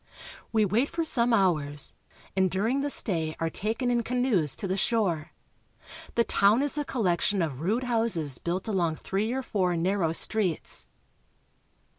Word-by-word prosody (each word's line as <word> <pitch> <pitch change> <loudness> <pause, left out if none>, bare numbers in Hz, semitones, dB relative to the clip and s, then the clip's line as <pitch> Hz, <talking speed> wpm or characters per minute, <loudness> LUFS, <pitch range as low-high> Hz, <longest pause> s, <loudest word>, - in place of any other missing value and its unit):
We 220 -2 +3
wait 225 +8 +1
for 335 0 -2
some 240 -6 +2
hours, 155 -9 +2 0.4
and 190 -1 +3
during 220 +9 0
the 290 - -1
stay 165 - -1
are 165 0 -1
taken 225 - -1
in 240 -1 +2
canoes 235 - +1
to 195 - -4
the 190 - -1
shore. 195 -7 0 0.8
The 235 - +4
town 215 +4 +3
is 290 - 0
a 295 - 0
collection 205 -6 0
of 145 -4 -4
rude 215 +9 0
houses 225 - +1
built 180 +4 -3
along 175 -6 0
three 200 +7 -2
or 265 +1 -2
four 185 -7 0
narrow 175 -1 +1
streets. 185 0 -1
200 Hz, 155 wpm, -27 LUFS, 170-235 Hz, 0.8 s, The